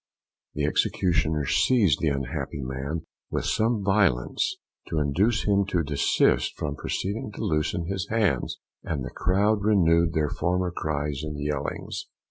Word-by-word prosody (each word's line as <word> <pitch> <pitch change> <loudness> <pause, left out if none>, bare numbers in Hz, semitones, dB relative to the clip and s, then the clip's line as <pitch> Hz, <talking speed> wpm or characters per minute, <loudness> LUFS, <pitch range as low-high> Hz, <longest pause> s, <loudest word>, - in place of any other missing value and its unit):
The - - 0
executioner 80 -5 +1
seized 100 - +3
the 80 - +2
unhappy 70 0 -2
man 65 +5 -4 0.2
with - - -2
some 110 -1 +1
violence, 95 - +1 0.3
to 80 - -3
induce 90 +11 +2
him 100 -1 +3
to 90 -4 +1
desist 70 -1 +2
from 75 -1 -3
proceeding 105 +8 -3
to - - -5
loosen 80 +2 0
his 95 +1 -3
hands, 105 - +1 0.3
and 70 -5 -3
the - - -6
crowd 105 +3 +2
renewed 85 -5 +4
their 75 -2 0
former 90 +1 0
cries 75 -4 -2
and 75 -1 -5
yellings. 75 -1 -3
85 Hz, 140 wpm, -26 LUFS, 75-100 Hz, 0.3 s, renewed